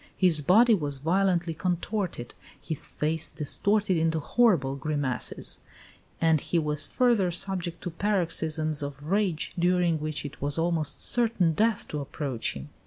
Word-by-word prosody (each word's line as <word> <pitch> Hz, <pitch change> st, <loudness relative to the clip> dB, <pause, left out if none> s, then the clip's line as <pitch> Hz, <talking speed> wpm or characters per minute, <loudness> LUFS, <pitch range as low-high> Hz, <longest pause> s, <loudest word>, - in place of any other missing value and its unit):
His 175 Hz, -5 st, +3 dB
body 225 Hz, -, +5 dB
was 145 Hz, -8 st, -1 dB
violently 175 Hz, +2 st, +1 dB
contorted; 180 Hz, -, -3 dB, 0.3 s
his 160 Hz, -4 st, -2 dB
face 160 Hz, +1 st, 0 dB
distorted 195 Hz, +5 st, 0 dB
into 160 Hz, 0 st, +1 dB
horrible 160 Hz, -, +2 dB
grimaces; 140 Hz, -3 st, -2 dB, 0.6 s
and 160 Hz, -3 st, +3 dB
he 175 Hz, -, -1 dB
was 150 Hz, -2 st, 0 dB
further 235 Hz, -7 st, +2 dB
subject 175 Hz, -1 st, -3 dB
to 175 Hz, -, -4 dB
paroxysms 160 Hz, -5 st, 0 dB
of 145 Hz, 0 st, -6 dB
rage, 195 Hz, -6 st, 0 dB
during 175 Hz, -2 st, +2 dB
which 150 Hz, -1 st, -3 dB
it 145 Hz, -, -9 dB
was 145 Hz, +2 st, -1 dB
almost 165 Hz, -2 st, -1 dB
certain 225 Hz, -9 st, +3 dB
death 220 Hz, +6 st, +1 dB
to 150 Hz, -, -3 dB
approach 135 Hz, -4 st, -2 dB
him." 70 Hz, +1 st, -9 dB
165 Hz, 140 wpm, -27 LUFS, 150-185 Hz, 0.6 s, body